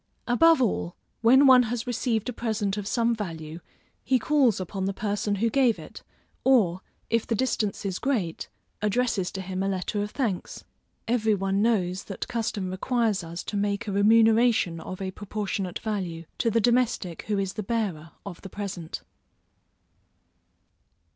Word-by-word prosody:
Above 325 +7 +5
all, 205 -7 0 0.3
when 260 +5 +6
one 260 -2 +8
has 240 0 -2
received 235 -2 -1
a 250 - -2
present 215 -4 -1
of 205 -2 -4
some 235 +1 +2
value, 165 -7 -6 0.4
he 260 - +3
calls 255 -4 +2
upon 190 +1 -3
the 195 0 -2
person 205 0 -1
who 220 +4 +1
gave 255 -4 +3
it, - - -11 0.4
or, 200 -9 +3 0.3
if 230 -1 +1
the 230 - +1
distance 215 -4 -1
is 190 -2 -2
great, 215 -12 -2 0.3
addresses 210 -3 0
to 190 - -5
him 190 0 -4
a 195 - 0
letter 195 +2 -2
of 205 - -2
thanks. 215 -7 -3 0.4
Every 220 -2 +2
one 195 0 0
knows 190 -5 +1
that 195 - -5
custom 215 -5 -2
requires 220 0 0
us 170 +1 -6
to - - -5
make 205 +2 -1
a - - -1
remuneration 220 -3 +4
of 185 +3 -6
a 190 - -3
proportionate 200 -2 -4
value, 180 -6 -4
to 230 - +2
the 230 +1 +2
domestic 235 -7 +1
who 210 -1 0
is 195 -1 -1
the 215 - -4
bearer 195 -7 -2 0.2
of 185 -4 -8
the 195 - -9
present. 185 -5 -6
210 Hz, 160 wpm, -26 LUFS, 190-230 Hz, 0.4 s, one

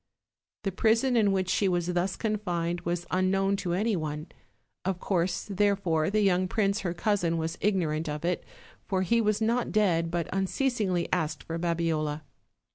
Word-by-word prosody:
The 195 - -1
prison 230 +6 +2
in 210 -4 +4
which 190 -1 0
she 195 +2 +2
was 175 -1 0
thus 180 +2 0
confined 175 -6 -2
was 175 0 -2
un 185 0 +2
known 195 +1 +2
to 180 -3 -2
any 215 +3 +1
one; 155 -1 -4 0.5
of 190 -1 -1
course, 180 -2 0
therefore, 195 -5 +1
the 215 +2 +2
young 185 -2 +3
prince 200 +1 +1
her 175 -2 -3
cousin 175 -4 +1
was 160 +1 -2
ignorant 165 -6 0
of 150 +2 -4
it, 180 0 0 0.4
for 190 -1 +1
he 230 +5 +2
was 215 0 +1
not 235 +2 +1
dead, 175 -6 +2
but 170 -1 -2
unceasingly 195 -2 0
asked 160 -3 -1
for 165 0 -4
Babiola. 165 -3 -1
185 Hz, 170 wpm, -28 LUFS, 170-205 Hz, 0.5 s, in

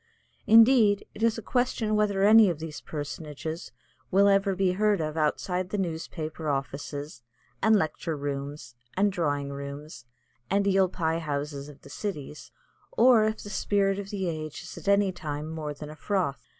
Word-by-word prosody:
Indeed, 225 -2 +6
it - - -10
is 230 0 +2
a 225 - -6
question 245 -3 0
whether 205 -2 +1
any 215 0 +7
of 170 - -2
these 160 -1 -7
personages 155 +2 -6 0.4
will 200 +2 +5
ever 195 -1 +3
be 185 -1 +2
heard 205 +2 +2
of 155 -1 -3
outside 180 +4 -1
the 210 - -2
newspaper 160 -3 -4
offices 140 +1 -4 0.4
and 220 0 +5
lecture 165 -3 -1
rooms 140 -2 -5 0.2
and 200 +1 +3
drawing 145 -6 -1
rooms 140 -1 -8 0.4
and 200 +1 +2
eel 190 -1 +3
pie 165 -2 -1
houses 145 -2 -4
of 145 -1 -14
the - - -14
cities, 155 -8 -6 0.4
or 250 - +5
if 215 0 -2
the 205 - -8
Spirit 200 -1 +1
of 200 -1 -6
the 195 -3 -2
Age 155 -2 -5
is - - -9
at - - -11
any 200 -1 +4
time 150 -4 -5
more 155 -2 -4
than 150 +1 -8
a - - -10
froth. 180 -5 -2
175 Hz, 170 wpm, -27 LUFS, 150-200 Hz, 0.4 s, any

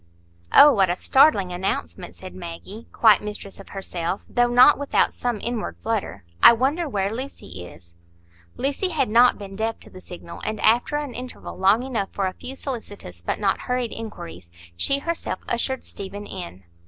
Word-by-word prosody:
"Oh, 295 - +9
what 195 -5 +3
a 175 - +1
startling 205 -5 +4
announcement!" 180 0 -3
said 185 -1 -10
Maggie, 185 +5 -9
quite 215 -4 +5
mistress 210 -2 -7
of 195 - -12
herself, 185 -2 -4
though 245 -1 +2
not 250 +5 +6
without 285 - +1
some 240 -3 -2
inward 235 0 -3
flutter. 215 - -3 0.2
"I - - +10
wonder 285 +7 0
where 200 -3 -1
Lucy 240 - -7
is." 85 0 -16 0.6
Lucy 285 +8 -1
had 305 -8 0
not 240 +3 +5
been 195 -1 -9
deaf 225 +2 -2
to - - -14
the 185 - -12
signal, 180 - -10
and 215 0 -3
after 240 +6 +3
an 295 -4 -3
interval 250 +1 -8
long 200 +5 +3
enough 230 -7 -2
for 195 - -1
a 185 - -2
few 260 +7 -8
solicitous 205 - -7
but 85 - -2
not 200 -2 +1
hurried 250 -2 0
inquiries, 90 - -8 0.3
she 275 - +1
herself 325 - -3
ushered 260 +2 -2
Stephen 200 +1 -8
in. 90 - -8
215 Hz, 175 wpm, -23 LUFS, 190-250 Hz, 0.6 s, I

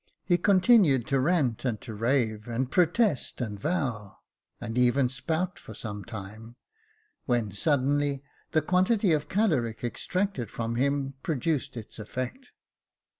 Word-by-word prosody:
He 175 -1 +2
con 195 -2 +4
tinued 180 - +5
to 135 -1 +1
rant 135 -5 +1
and 120 -5 -1
to 110 - -7
rave, 110 -1 0
and 125 +3 -2
protest 180 - +2
and 105 -5 -4
vow, 120 - -2 0.4
and 115 -1 -5
even 125 +1 +3
spout 165 +7 -2
for 110 - -11
some 105 -3 -6
time, 110 +1 -9 0.7
when 120 -5 +1
suddenly 140 - +1 0.3
the 155 - +2
quantity 185 +3 +2
of 150 -1 0
caloric 140 - +1
extracted 160 - -2
from 115 +1 -3
him 140 +2 0
produced 155 -5 -1
its 115 0 -9
effect. 130 - -5
130 Hz, 135 wpm, -28 LUFS, 115-165 Hz, 0.7 s, tinued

